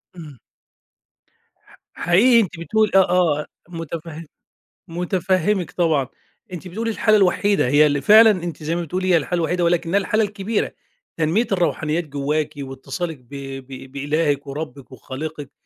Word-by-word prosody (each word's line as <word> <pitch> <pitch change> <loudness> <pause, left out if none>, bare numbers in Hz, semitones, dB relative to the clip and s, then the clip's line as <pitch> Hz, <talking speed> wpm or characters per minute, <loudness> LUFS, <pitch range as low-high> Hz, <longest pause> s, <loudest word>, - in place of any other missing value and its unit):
إمم 155 -6 -11 1.3
حق - - -22
حقيقي 225 +8 +4
أنتِ 185 -6 -2
بتقولي 215 +5 +1
آه 180 -5 +3
آه 150 - -4 0.2
متفه 165 -1 -7 0.6
متفهّمِك 180 +2 0
طبعًا، 160 -7 +1 0.5
أنتِ 180 +1 -7
بتقولي 225 +6 -3
الحالة 215 0 +3
الوحيدة، 200 -3 +2
هي 145 +4 +5
اللي 145 -1 +1
فعلًا 220 +7 +7
أنتِ 175 -4 -5
زي 160 +2 -1
ما 175 - -1
بتقولي 185 +3 -3
هي - - +6
الحالة 170 +3 -2
الوحيدة، 175 +2 0
ولكنها 170 +2 +1
الحالة 215 +2 +1
الكبيرة 205 +1 -2 0.5
تنمية 165 +9 +1
الروحانيات 165 -2 0
جواكِ 145 +1 -2
واتصالِك 140 +5 -5
ب 125 -2 -26 0.4
ب 135 -1 -10
بإلاهِك 145 0 -1
وربِّك 140 -2 -7
وخالقِك، 140 +3 -7
170 Hz, 140 wpm, -21 LUFS, 150-185 Hz, 1.3 s, فعلًا